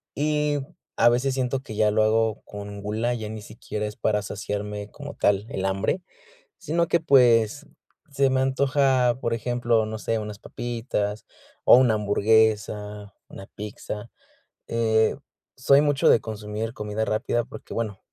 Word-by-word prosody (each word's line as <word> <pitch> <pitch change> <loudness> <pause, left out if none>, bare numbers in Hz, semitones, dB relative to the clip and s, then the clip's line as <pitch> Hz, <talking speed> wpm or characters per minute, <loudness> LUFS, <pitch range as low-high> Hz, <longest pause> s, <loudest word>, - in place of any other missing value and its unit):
y 150 0 0 0.4
a - - +6
veces 125 +3 +1
siento 130 0 -1
que 110 - -9
ya 105 0 +3
lo 110 +1 +3
hago 110 0 +1
con 100 0 -8
gula, 110 +4 -1
ya 110 -2 -5
ni 110 0 -7
siquiera 105 0 -6
es 105 0 -6
para 105 -1 +1
saciarme 105 +1 -5
como 145 0 -9
tal 100 0 +1
el 95 - -3
hambre. 95 - 0 0.6
Sino 170 +2 0
que, 170 - +2
pues, 125 -2 +4 0.5
se 140 -1 +2
me 130 0 +1
antoja, 130 -2 +2
por 115 - -1
ejemplo, 120 -1 +1
no 110 0 -5
sé, 115 +1 -1
unas 105 -1 -7
papitas, 115 -4 -4 0.4
o - - +9
una 125 -3 +4
hamburguesa, 105 -1 +1 0.2
una 95 - -10
pizza. 105 +1 -7 0.6
Eh, 110 -1 +2 0.4
soy 140 +2 +5
mucho 145 -2 +3
de - - +6
consumir 110 +1 -5
comida 105 -1 -3
rápida 120 +2 0
porque, - - -10
bueno, 110 -4 -3
110 Hz, 150 wpm, -25 LUFS, 105-125 Hz, 0.6 s, o